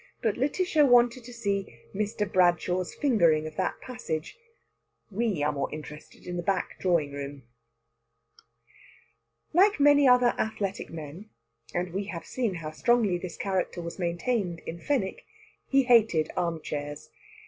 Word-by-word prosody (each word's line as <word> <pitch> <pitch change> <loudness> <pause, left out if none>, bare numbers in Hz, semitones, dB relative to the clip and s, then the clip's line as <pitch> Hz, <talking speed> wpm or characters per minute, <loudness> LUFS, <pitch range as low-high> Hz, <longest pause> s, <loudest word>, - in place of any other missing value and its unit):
But 220 -3 +2
Lætitia 295 +1 +2
wanted 245 0 +4
to 245 - -9
see 200 -4 -3 0.2
Mr. 210 +1 -1
Bradshaw's 180 -1 +2
fingering 170 - +3
of 155 0 -7
that - - -1
passage. 210 -11 -5 0.8
We 205 -6 0
are 150 - +2
more 140 -1 -3
interested 150 0 -10
in 180 0 -4
the - - -1
back 190 0 -2
drawing 170 -6 +1
room. 140 -1 -7 2.1
Like 390 +2 +4
many 285 -1 +6
other 250 -1 +5
athletic 200 -3 -2
men 165 +6 -9 0.4
and 175 0 -3
we 195 +2 -2
have 180 -4 -6
seen 235 -7 -2
how 155 -2 -5
strongly 210 +1 +2
this 175 -2 -7
character 190 -2 -2
was 170 +2 -6
maintained 175 +1 -1
in 170 - -7
Fenwick 235 -5 -1 0.4
he 275 0 +4
hated 225 -10 +4
armchairs. 150 -4 -4
190 Hz, 135 wpm, -28 LUFS, 165-240 Hz, 2.1 s, many